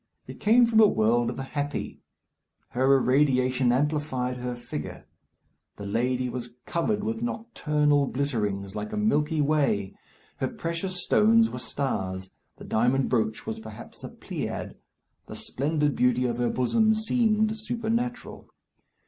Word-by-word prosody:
It - - -10
came 235 +3 +5
from 225 -1 +3
a 215 - +8
world 115 - +2
of 120 - -4
the 135 - -4
happy. 145 +1 -4 0.7
Her 130 +2 +3
irradiation 130 -2 +2
amplified 130 -2 0
her 125 0 -4
figure. 100 -11 -7 0.7
The 100 - -8
lady 125 +5 0
was 120 -1 -6
covered 205 +5 -1
with 225 +1 -2
nocturnal 150 - +1
glitterings, 105 -8 -2
like 105 0 -4
a - - -2
milky 160 -8 +1
way. 140 -10 +1 0.4
Her - - -1
precious 180 +2 -4
stones 225 +3 +4
were - - -5
stars. 95 -8 -3 0.3
The - - -11
diamond 125 +4 +1
brooch 110 -3 0
was 225 0 -4
perhaps 220 - -11
a - - -5
pleiad. - - -5 0.5
The - - -8
splendid 150 +1 0
beauty 125 0 +2
of 120 -1 -1
her 120 - +1
bosom 220 - +2
seemed 220 -1 +1
supernatural. 230 +2 -3
140 Hz, 140 wpm, -26 LUFS, -, 0.7 s, a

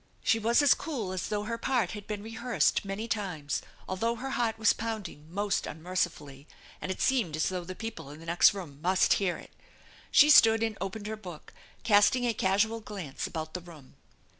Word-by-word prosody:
She 225 - +3
was 235 +6 +3
as 285 - +7
cool 250 - -4
as 185 -1 -3
though 210 -1 -2
her 230 +2 -4
part 235 -9 0
had 210 -1 -8
been 210 -1 -4
rehearsed 225 +2 0
many 200 +3 -4
times, 180 -10 -2 0.3
although 230 +5 -1
her 265 +3 -5
heart 235 -4 0
was 220 -1 +4
pound 220 -3 -4
ing 155 0 -15
most 200 +2 -1
unmercifully, 155 -4 -4 0.3
and 185 - -3
it 190 - -5
seemed 230 - +1
as 155 - 0
though 180 -1 -3
the 185 +2 -7
people 225 -9 -7
in 150 +2 -10
the 165 - -12
next 170 +1 +5
room 150 -7 -8
must 185 +2 +3
hear 185 -3 0
it. - - -13 0.6
She 295 +1 +7
stood 225 -4 +7
and 225 -1 -1
opened 205 +2 -4
her 215 +1 -3
book, 180 -7 -11 0.3
casting 220 +4 +4
a 235 - +1
casual 205 +3 +1
glance 195 -10 -6
about 160 -1 -6
the 180 - -4
room. 160 -6 -14
205 Hz, 200 wpm, -29 LUFS, 175-225 Hz, 0.6 s, as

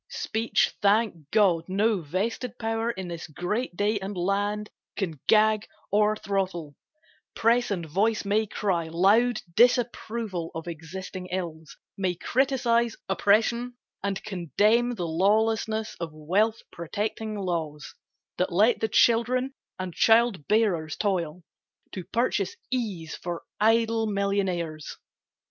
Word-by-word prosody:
Speech, 225 +1 0
thank 200 -7 +2
God, 180 -5 +3
No 200 +1 +1
vested 210 - -3
power 225 0 -1
in 190 -6 -4
this 170 -1 -6
great 180 - -3
day 205 +1 +1
and 195 0 -5
land 205 +3 -1 0.3
Can 165 -8 -3
gag 215 0 +4 0.2
or 210 +1 +3
throttle; 185 -8 -3 0.6
Press 240 +2 +3
and 180 -5 -2
voice 205 +8 0
may 210 +2 +1
cry 185 -5 -1
Loud 210 +8 +3
disapproval 230 -6 +1
of 160 +1 -6
existing 180 +3 -7
ills, 170 -4 -5 0.2
May 185 -2 0
criticise 235 0 +1
oppression 230 +5 +2 0.2
and 200 0 -2
condemn 210 - +1
The 180 -5 -3
lawlessness 220 +5 +1
of 170 -1 -3
wealth 190 +9 0
protecting 210 +5 -4
laws 165 -6 -3 0.5
That 180 - +1
let 210 +7 +4
the 220 - +1
children 250 +4 +3 0.2
and 185 -2 -5
child 225 -7 +3
bearers 185 -8 +1
toil 180 -4 -1 0.5
To 185 - -6
purchase 210 -1 0 0.2
ease 200 -11 -3
for 175 -1 -5 0.2
idle 225 +1 +3
millionaires. 190 -6 -2
200 Hz, 120 wpm, -26 LUFS, 175-225 Hz, 0.6 s, gag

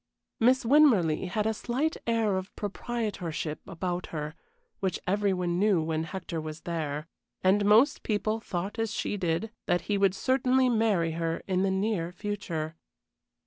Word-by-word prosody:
Miss 255 +2 +4
Winmarleigh 225 - +4
had 210 +3 -1
a 220 - +2
slight 260 +8 -1
air 225 -4 +2
of 190 +1 -5
proprietorship 205 -8 -3
about 180 +1 -3
her, 150 -1 -4 0.5
which 190 -3 -1
every 200 +1 +2
one 180 -1 0
knew 200 -3 +4
when 160 0 -1
Hector 170 -1 -5
was 155 0 -7
there. 155 -3 -3 0.4
And 195 +2 +4
most 220 +7 +5
people 215 +1 0
thought 195 +1 -4
as 225 -1 0
she 210 - -2
did, 180 +3 -1 0.2
that 175 -1 +2
he 200 +3 -1
would 195 -1 +3
certainly 260 +2 +2
marry 215 -8 +2
her 165 0 -2
in 185 -1 +1
the 195 - +2
near 190 -3 0
future. 180 -5 -4
190 Hz, 155 wpm, -28 LUFS, 170-220 Hz, 0.5 s, most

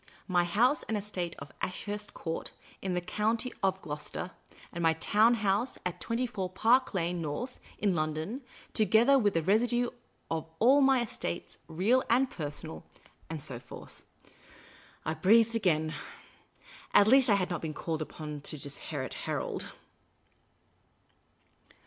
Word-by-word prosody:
" - - -31
My 175 - +5
house 240 - +3
and 220 - +1
estate 190 -4 -3
of 140 0 -9
Ashurst 205 +3 -4
Court, 165 -1 -4 0.3
in 185 -2 -1
the 180 - 0
County 220 +7 -1
of 190 -1 +1
Gloucester, 150 +4 -5 0.4
and 170 - -4
my 165 -1 +4
town 215 +8 +4
house 210 +3 +1
at 180 - -3
24 230 -5 -2
Park 235 +8 +3
I^ane 175 -2 -1
North, 170 - -4 0.2
in 200 -3 +2
London, 155 - -2 0.3
together 230 +5 +5
with 205 -6 +2
the 165 - +2
residue 240 +6 +2 0.4
of 160 0 -2
all 265 - +6
my 265 -2 +5
estate, 195 -5 -4
real 205 +11 +3
or 250 +3 +5
personal 145 - -6 0.2
" - - -32
and 160 -3 -4
so 130 -5 -1
forth. - - -12 1.0
I 155 - 0
breathed 225 +8 +4
again. 160 -7 +1 1.0
At 205 - +8
least, 260 +1 +6
I 205 - +6
had 185 -2 0
not 175 - -2
been 155 -2 -4
called 160 0 -3
upon 150 -1 -6
to 150 - -2
disinherit 140 -1 -5 0.2
Harold. - - -2
190 Hz, 145 wpm, -30 LUFS, 160-230 Hz, 1.0 s, At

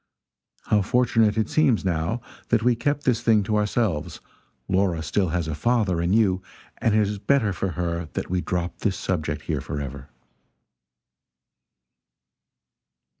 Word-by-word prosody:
How 105 - +2
fortunate 115 -1 +2
it 110 -1 +1
seems, 135 -10 +2
now, 85 +6 -1 0.3
that 115 -2 +2
we 125 0 +4
kept 145 +4 -1
this 120 -3 +1
thing 110 -3 +3
to 105 +2 -1
ourselves; 105 -6 0 0.5
Laura 95 -4 +1
still 90 +3 0
has 85 0 -1
a 80 - -2
father 95 0 +1
in 85 +1 0
you, 100 -4 +3 0.4
and 110 -2 +2
it 110 - +4
is 105 0 -4
better 110 -3 +2
for 90 +1 -3
her 85 -2 -3
that - - -3
we 90 0 -1
drop 90 -1 -3
this 100 -3 0
subject 75 -5 -2
here - - -2
forever." 70 -1 -6
100 Hz, 145 wpm, -24 LUFS, 85-115 Hz, 0.5 s, we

